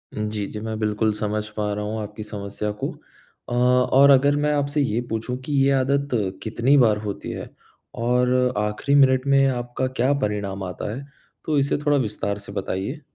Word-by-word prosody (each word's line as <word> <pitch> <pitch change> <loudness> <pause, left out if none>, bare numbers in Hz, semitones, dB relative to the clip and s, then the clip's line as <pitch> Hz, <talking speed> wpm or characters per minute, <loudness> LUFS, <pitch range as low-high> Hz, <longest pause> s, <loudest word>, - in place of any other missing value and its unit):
उम, 105 0 -2
जी, 105 -2 -2
जी। 105 - -7
मैं 110 0 -4
बिल्कुल 110 0 +1
समझ 105 0 -2
पा 105 -1 -1
रहा 105 0 -3
हूँ, 110 +1 -3
आपकी 105 +1 -7
समस्या 105 0 -4
को। - - 0 0.6
अ, - - -3
और 125 +3 +4
अगर 140 +1 +5
मैं 150 0 +1
आपसे 145 +1 0
ये 120 -2 0
पूछूँ, 115 +3 -3
कि 135 +3 -6
ये 140 - +3
आदत 140 +2 0 0.3
कितनी 120 +6 +2
बार 110 -5 +4
होती 100 -1 -5
है? - - -6 0.5
और 125 +1 +2
आखिरी 105 +7 0
मिनट 130 -1 +4
में 135 0 +5
आपका 125 0 -2
क्या 130 +4 +3
परिणाम 100 -2 -2
आता 95 +3 -5
है? 140 +2 -7 0.4
तो 155 -2 +1
इसे 140 +1 +1
थोड़ा 145 -1 +4
विस्तार 105 -4 -2
से 100 -1 -10
बताइए। 100 - -4
120 Hz, 185 wpm, -23 LUFS, 105-135 Hz, 0.6 s, अगर